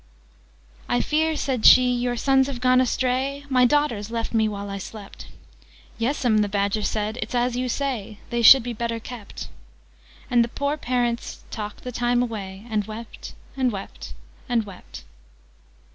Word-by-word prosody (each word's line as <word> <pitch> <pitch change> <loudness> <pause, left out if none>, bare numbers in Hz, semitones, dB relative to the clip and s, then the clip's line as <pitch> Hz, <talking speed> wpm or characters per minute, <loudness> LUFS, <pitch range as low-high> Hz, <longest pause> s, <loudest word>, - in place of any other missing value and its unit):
"'I 245 - +2
fear,' 315 +1 +1
said 260 -6 -2
she, 250 -1 +7
'your 245 0 -1
sons 270 +1 +3
have 270 -3 -5
gone 255 0 +4
astray? 260 +3 -1
My 255 -2 +4
daughters 245 -7 +1
left 230 0 -3
me 220 -1 +3
while 200 -1 -5
I 200 0 -5
slept.' 200 +1 -10 0.7
'Yes 255 +4 -1
'm,' 220 -3 +4
the 205 -1 +1
Badger 200 +1 0
said: 215 +2 -2
'it's 220 +3 -4
as 245 0 +1
you 250 0 -1
say.' 240 -6 -3
'They 235 0 0
should 260 +2 +9
be 240 0 -4
better 230 0 -3
kept.' 225 -2 -8 0.8
Thus 240 -1 +3
the 235 - +2
poor 280 +4 -2
parents 245 -3 -2
talked 210 -2 -6
the 250 - -5
time 245 0 +1
away, 200 -4 -6
And 215 -2 0
wept, 220 +2 -9 0.2
and 260 -2 +1
wept, 195 -2 -8 0.3
and 235 -2 +2
wept." 195 -2 -11
240 Hz, 165 wpm, -24 LUFS, 215-255 Hz, 0.8 s, should